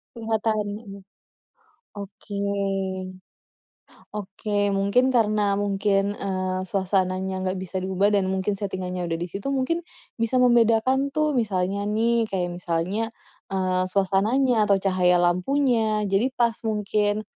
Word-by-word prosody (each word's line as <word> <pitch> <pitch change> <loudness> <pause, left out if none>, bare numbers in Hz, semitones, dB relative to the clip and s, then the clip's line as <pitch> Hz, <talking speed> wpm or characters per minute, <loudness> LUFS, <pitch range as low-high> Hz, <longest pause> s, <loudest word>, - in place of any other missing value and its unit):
Kelihatan, 220 -2 -1
mhm. 200 -2 -10 1.0
Oke. 200 0 -8 1.8
Oke 205 0 -2
mungkin 200 +7 +3
karena 210 -4 +2
mungkin, 200 0 +1
eee, 185 -2 -2
suasananya 190 -1 0
nggak 185 0 -1
bisa 185 0 -4
diubah 190 +2 +1
dan 195 -2 +2
mungkin 190 +2 0
settingannya 185 -3 -4
udah 165 - -1
di 175 - -3
situ, 195 +7 -4
mungkin 275 +5 0 0.4
bisa 230 +3 +1
membedakan 245 +2 +4
tuh 305 +2 0
misalnya 200 -4 -1
nih 225 +1 +1
kayak 180 -3 -2
misalnya, 180 +6 -2 0.4
eee, 185 -1 0
suasananya 210 +5 +2
atau 200 - +5
cahaya 185 -2 +2
lampunya. 215 +4 +2
Jadi 200 +5 +1
pas 235 -2 +2
mungkin 210 0 0
200 Hz, 115 wpm, -24 LUFS, 190-225 Hz, 1.8 s, atau